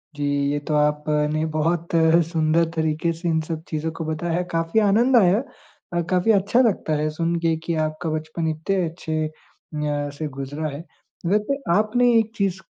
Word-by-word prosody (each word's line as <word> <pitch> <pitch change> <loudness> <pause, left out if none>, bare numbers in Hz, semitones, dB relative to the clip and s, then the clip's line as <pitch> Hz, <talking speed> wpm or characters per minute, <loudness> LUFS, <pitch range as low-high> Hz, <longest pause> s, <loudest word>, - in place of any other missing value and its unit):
जी, 145 -1 -2 0.3
ये 145 - 0
तो 150 +1 -4
आपने 150 +1 +1
बहुत 165 +2 0 0.4
सुंदर 160 0 +2
तरीके 160 +1 0
से 170 +1 -3
इन 160 -1 +2
सब 155 0 -5
चीज़ों 160 +1 -3
को - - -2
बताया। 165 +2 -1
काफ़ी 165 +5 +1
आनंद 225 +5 +3
आया 190 -1 +5 0.6
अ, 175 - +1
काफ़ी 185 +4 +3
अच्छा 205 +4 +3
लगता 200 -9 +1
है 155 +1 0
सुनके 165 0 0
कि 170 - -1
आपका 155 +2 -4
बचपन 155 +1 -3
इतने 160 +5 -1
अच्छे 160 -2 -3
अ, - - -11 0.9
से 155 - -3
गुज़रा 140 +3 -5
है। 145 +4 -7 0.4
वैसे 210 +9 +1 0.2
आपने 240 +4 +3
एक 220 0 +1
चीज़ 195 -3 0
165 Hz, 165 wpm, -23 LUFS, 155-185 Hz, 0.9 s, आया